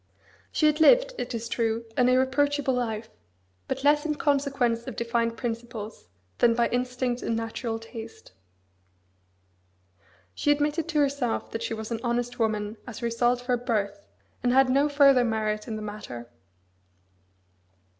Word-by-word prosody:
She - - +1
had 305 0 +3
lived, - - +6
it 245 0 -3
is 230 0 -4
true, 230 0 -1
an 250 0 +4
irreproachable 270 +2 +2
life, 225 -3 -2 0.6
but 265 0 -3
less 295 +1 +4
in 310 -1 -1
consequence 275 -5 0
of 260 - -5
defined 230 0 -1
principles 230 - -5 0.3
than 230 -1 +4
by 235 0 +2
instinct 250 0 -1
and 230 - -1
natural 225 0 -3
taste. 225 0 -10 2.0
She 290 - -1
admitted 295 +2 +1
to 335 -2 -2
herself 280 -5 0
that 225 - -4
she 230 - -2
was 220 +1 -7
an 230 - -1
honest 245 0 -1
woman 215 -1 -1
as 245 0 -8
a - - 0
result 240 +1 +1
of - - -15
her 250 -1 +2
birth, 205 -4 -2 0.3
and 245 - +2
had 265 0 +5
no 280 +3 +3
further 275 -3 +5
merit 215 -2 -1
in 225 - -3
the 215 - -5
matter. 125 - -7
240 Hz, 155 wpm, -27 LUFS, 225-270 Hz, 2.0 s, lived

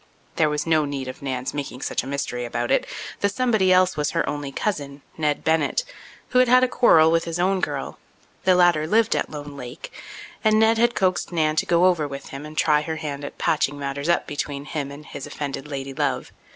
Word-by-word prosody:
There 155 -2 +3
was 150 0 -2
no 160 -2 +3
need 140 -2 -4
of 130 - -8
Nan's 130 -2 -3
making 140 -3 -5
such - - -1
a 130 - -9
mystery 135 -3 -3
about 120 0 -2
it. - - +2 0.3
The 200 - +2
somebody 215 -4 +2
else 185 0 +4
was 150 -1 0
her - - +1
only 145 -1 -3
cousin, 145 -7 -3
Ned 150 -2 -1
Bennett, 160 - +1 0.5
who 250 - +3
had 255 - +5
had 255 +1 +6
a - - +4
quarrel 160 -11 +5
with 165 0 +2
his 165 0 -3
own 190 +2 +2
girl; - - -3 0.4
the 185 - +4
latter 175 -4 +4
lived 225 +4 +3
at - - -1
Lone 145 -1 -8
Lake, 125 +1 -8 0.5
and 215 -1 +4
Ned 225 0 +4
had 240 +1 +3
coaxed 185 -2 0
Nan 155 -2 +1
to - - +1
go 170 +1 +4
over 170 -5 +2
with 140 0 -8
him 140 +2 -7
and 155 +1 -12
try 150 -1 +3
her 160 +1 -4
hand 145 -3 -5
at 145 - -7
patching 145 -2 +1
matters 140 +2 -3
up 170 - +2
between 145 -1 -4
him 145 -2 -4
and 145 +2 -10
his 140 - -8
offended 145 -1 -5
lady 135 -1 -5
love. - - -2
150 Hz, 220 wpm, -23 LUFS, 140-180 Hz, 0.5 s, had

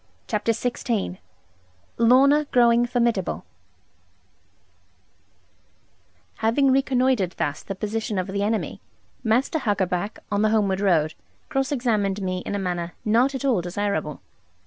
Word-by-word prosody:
CHAPTER 220 0 0
XVI 230 -4 -2 0.8
LORNA 275 +6 +5
GROWING 240 -3 +4
FORMIDABLE 235 -6 0 2.9
Having 265 +5 +2
reconnoitred 255 -7 +2
thus 145 0 -2
the 195 - -6
position 215 +1 -3
of 185 - 0
the 200 +1 -3
enemy, 215 +2 -2 0.4
Master 250 +8 +1
Huckaback, 200 -4 -1
on 205 0 +1
the 215 - +3
homeward 200 -3 +1
road, 165 -6 +2 0.4
cross 270 -2 -1
examined 215 -7 0
me 185 -2 -2
in - - -2
a - - 0
manner 175 -3 -3
not 240 +6 +3
at 265 - -3
all 245 -9 +2
desirable. 175 -4 -3
215 Hz, 120 wpm, -24 LUFS, 190-245 Hz, 2.9 s, LORNA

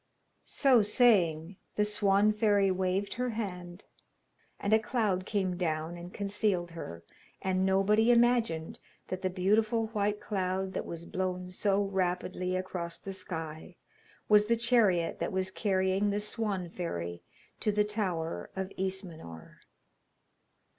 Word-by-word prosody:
So 260 -5 +4
saying, 190 -6 +3 0.2
the 210 - +2
Swan 210 0 +3
fairy 205 -3 +3
waved 185 +2 -1
her 250 +1 -2
hand, 180 -4 -5 0.7
and 200 - 0
a 220 - +6
cloud 210 -5 -1
came 190 -4 0
down 160 -1 -2
and 175 +1 -9
concealed 200 -4 -1
her, 85 - -8 0.4
and 190 0 0
nobody 210 +4 +3
imagined 235 -9 +2 0.3
that 185 0 -3
the 185 - 0
beautiful 215 +4 +1
white 210 -1 0
cloud 190 -1 -2
that - - -3
was 170 0 -6
blown 180 0 -3
so 200 +2 +1
rapidly 185 -1 -1
across 180 -2 -4
the 195 - -7
sky 165 -2 -6 0.5
was 210 0 +5
the 235 +1 +3
chariot 225 -8 +2
that 170 - -2
was 190 0 -1
carrying 190 0 +1
the 205 +1 0
Swan 210 -3 -2
fairy 85 - -5 0.4
to 210 - +1
the 210 0 +2
tower 175 - -3
of 190 0 -3
Ismenor. 175 - -6
190 Hz, 135 wpm, -30 LUFS, 180-210 Hz, 0.7 s, a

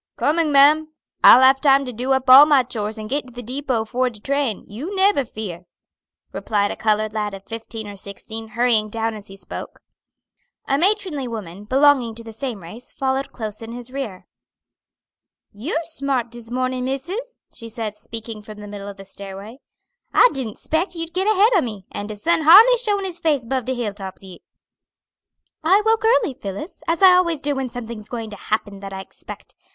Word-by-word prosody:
"Coming, 315 0 +1
ma'am. 300 +3 +5 0.3
I'll 255 - +9
have 265 +1 +5
time 275 -1 +4
to 250 - -6
do 250 +4 -3
up 265 0 -1
all 270 +3 +10
my 285 -4 +5
chores 220 -3 -4
and 215 0 -6
git 275 +3 -2
to 250 - -14
the 245 +1 -8
depot 250 -2 -2
'fore 255 +3 0
de 225 -3 -12
train; 275 -3 -1
you 285 - -6
neber 385 -7 +3
fear," 185 -6 -7 0.7
replied 205 -2 0
a - - -4
colored 215 0 0
lad 210 -2 -2
of 195 - -13
fifteen 225 -1 -7
or 205 - -8
sixteen, 220 +3 -7
hurrying 230 -3 +2
down 225 +1 -2
as 210 -1 -10
he 195 - -12
spoke. 185 - -8 0.9
A 275 +1 +1
matronly 370 -7 +1
woman, 205 -4 -7
belonging 260 -2 +3
to 230 - -8
the 225 -1 -10
same 230 -5 -5
race, 220 +9 -12
followed 270 0 -1
close 215 -2 -6
in 225 +1 -8
his 245 +1 -9
rear. 255 -9 -6 1.3
"You're 300 +10 -3
smart 275 -7 -2
dis 235 -1 -7
mornin', 255 0 -2
missis," 370 - -4 0.2
she 230 - -10
said, 220 -2 -5
speaking 225 0 -8
from 215 0 -11
the 210 0 -9
middle 205 -1 -8
of 200 -1 -8
the 195 - -11
stairway. 200 +5 -10 0.6
"I - - +7
didn't 245 -6 -5
'spect 335 +4 -1
you'd 330 0 -6
git 375 +3 0
ahead 430 +2 +4
o' 370 - +5
me, 210 - -6
and 205 +1 -6
de 215 - -5
sun 330 +10 +1
hardly 420 +11 +8
showin' 415 -4 -1
his 355 -2 -5
face 295 -7 +1
'bove 255 0 -2
de 260 - -2
hill 230 -4 -3
tops 195 -2 -9
yit." 185 -2 -12 1.2
"I 385 +6 +4
woke 445 0 +2
early, 445 - +3
Phillis, 225 - -7
as 335 +3 0
I 370 -1 +9
always 340 -4 +2
do 290 0 -1
when 265 -2 -3
something's 230 -3 -8
going 225 -3 -5
to - - -7
happen 205 0 -3
that 195 0 -8
I 190 - -5
expect. - - -12
245 Hz, 200 wpm, -21 LUFS, 215-290 Hz, 1.3 s, all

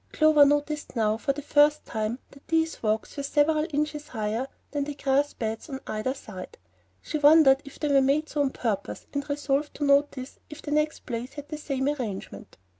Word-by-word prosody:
Clover 310 -2 +6
noticed 290 0 0
now, 215 -2 +2
for 275 - 0
the 285 +1 -6
first 295 +1 +3
time, 220 +1 -2
that 275 - -18
these 325 0 0
walks 220 0 -1
were - - -1
several 305 +2 +2
inches 300 0 -2
higher 225 +1 -2 0.2
than 290 -1 -1
the 290 0 -5
grass 280 +1 +1
beds 225 +4 -4
on 265 -1 -5
either 215 +5 -2
side. 190 -8 -10 0.5
She 305 - -3
wondered 290 -2 +6
if 280 - -11
they 300 - -1
were 275 - +6
made 285 +4 +2
so 295 - -1
on 280 - +2
purpose, 215 -6 -3
and 285 +1 -3
resolved 285 0 -1
to 295 - -4
notice 280 -2 +1
if 300 +1 -10
the 295 - -5
next 300 +1 0
place 240 0 -5
had 290 -1 -8
the 305 - -4
same 275 -3 -2
arrangement. 220 - -5
280 Hz, 195 wpm, -26 LUFS, 255-300 Hz, 0.5 s, Clover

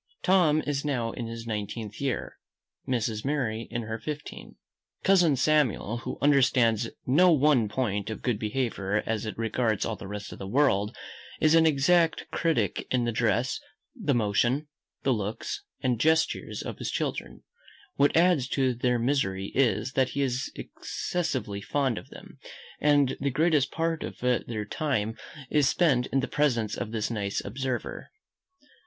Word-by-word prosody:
Tom 170 -5 +4
is 145 -1 -1
now 125 -6 -1
in 115 -1 -5
his 115 0 -7
nineteenth 105 0 -5
year. 135 -3 -3 0.5
Mrs. 115 -4 -1
Mary 120 -6 -1
in 120 0 -3
her 110 +1 -4
fifteenth. 150 -1 -7 0.5
Cousin 180 -6 +5
Samuel, 130 -6 +2
who - - -5
understands 125 -5 +3 0.2
no 175 +8 +5
one 140 -7 +4
point 105 -3 -1
of 110 - -6
good 120 -5 0
behaviour 105 -3 -1
as 110 0 -2
it 110 - -5
regards 115 -1 0
all 115 - -2
the 100 - -9
rest 105 +1 -6
of - - -11
the 95 - -6
world, 105 -4 +2 0.4
is 155 0 +4
an 165 0 +6
exact 160 +3 +2
critic 165 -2 0
in 125 -1 +1
the 120 - 0
dress, 115 +2 +1 0.4
the 180 - 0
motion, 120 +6 +1 0.4
the 135 - +3
looks, 110 - -3 0.2
and 125 -4 0
gestures, 160 +4 +1
of - - -6
his - - -3
children. - - -3 0.5
What 145 +3 +3
adds 170 -7 +4
to 130 -1 +1
their 125 +1 +1
misery 110 -7 0
is, 130 0 +2
that 130 -1 +2
he 140 - -1
is 125 0 -2
excessively 125 - -3
fond 135 -1 0
of - - -15
them, - - -13 0.4
and 145 -3 +3
the 140 - +1
greatest 150 -1 +2
part 165 0 -1
of - - -6
their 120 -3 -1
time 110 -3 -1 0.4
is 145 -3 +4
spent 135 -8 +2
in 135 - +1
the - - -2
presence 120 -8 +1
of 110 - -4
this 110 0 -2
nice 100 -3 -2
observer. 125 +3 -4
125 Hz, 160 wpm, -27 LUFS, 110-145 Hz, 0.5 s, an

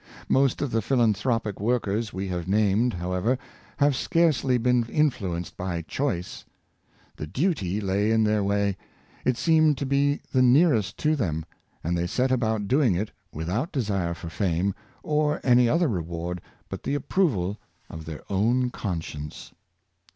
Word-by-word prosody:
Most 135 +1 +2
of 140 - -2
the 115 - +1
philanthropic 115 -3 +1
workers 110 -1 0
we 95 +1 -4
have 90 -1 -3
named, 105 +3 +2
however, 90 +8 0 0.4
have 140 -1 +3
scarcely 140 -4 +2
been 125 0 +2
influenced 100 - -1
by 90 -2 -3
choice. 90 - -3 0.7
The 75 - -5
duty 105 - 0
lay 100 +1 0
in 110 0 +3
their 105 -1 +2
way 100 -1 0 0.2
— - - -29
it 130 -2 +2
seemed 155 -2 +4
to 140 - -2
be 140 +1 +1
the 130 - +3
nearest 125 - +4
to 155 +1 +4
them 80 - -2 0.2
— - - -40
and 85 +2 0
they 85 0 0
set 130 +8 0
about 110 -5 0
doing 130 - +3
it 105 +4 -2 0.2
without 90 - -2
desire 100 - -1
for 85 0 -7
fame, 90 +3 0 0.3
or 150 0 +1
any 125 -2 +5
other 165 +5 +3
reward 85 - -3 0.3
but - - -6
the 140 - -2
approval 115 - 0 0.3
of 80 0 -9
their 80 -2 -7
own 120 +6 +1
conscience. 80 -8 -5
110 Hz, 155 wpm, -26 LUFS, 90-130 Hz, 0.7 s, any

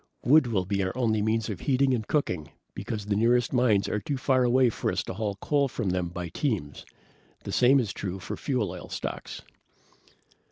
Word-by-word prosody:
Wood 140 +2 +5
will 100 -6 0
be 100 +1 -1
our 95 +5 -2
only 110 -4 +1
means 110 0 0
of 100 -6 -5
heating 135 -1 +2
and 110 -4 -2
cooking 90 - -1 0.2
because 105 +1 -5
the 105 -1 0
nearest 120 +3 +2
mines 120 -6 +3
are 105 - -1
too 135 +8 -3
far 130 -1 +2
away 125 0 +4
for - - -2
us - - -1
to - - -6
haul 105 0 -3
coal 140 +6 +1
from 120 -5 -3
them 90 -1 -1
by 85 0 -5
teams. 100 - -3 0.6
The - - -5
same 130 +2 +5
is 110 -6 -2
true 95 -2 -4
of 95 - -6
fuel 125 -7 -1
oil - - -9
stocks. - - -6
110 Hz, 200 wpm, -27 LUFS, 100-130 Hz, 0.6 s, Wood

